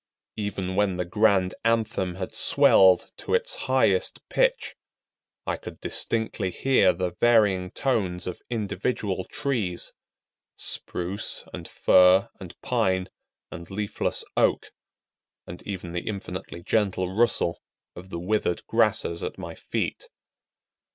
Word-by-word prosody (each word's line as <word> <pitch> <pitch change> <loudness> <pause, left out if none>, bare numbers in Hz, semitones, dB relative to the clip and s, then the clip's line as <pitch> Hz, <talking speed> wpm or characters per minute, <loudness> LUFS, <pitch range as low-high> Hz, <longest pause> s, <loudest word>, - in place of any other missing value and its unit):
Even 100 -3 -3
when 100 -2 +1
the 90 - -1
grand 95 -1 +2
anthem 110 -5 0
had 95 0 -5
swelled 95 -2 +5
to - - -1
its 470 +1 +1 0.2
highest - - +1
pitch, - - +1 0.7
I - - -1
could - - -10
distinctly 110 -4 -1
hear 115 -3 +3
the 90 0 -2
varying 100 -2 +3
tones 95 -8 -1
of 90 - -6
individual 105 -3 -2
trees,—Spruce, 100 -5 -3
and - - -7
Fir, 90 +1 +5
and 90 -3 -11
Pine, 95 -6 0 0.4
and 85 - -9
leafless 105 +1 -2
Oak,—and 85 - -4
even 90 -4 -5
the 85 0 -5
infinitely 100 -4 -6
gentle 95 -3 0
rustle 105 -5 +2 0.3
of 90 +2 -11
the 85 - -5
withered 90 -1 -1
grasses 85 0 +1
at - - -5
my - - -7
feet. - - -4
95 Hz, 115 wpm, -25 LUFS, 90-110 Hz, 0.7 s, swelled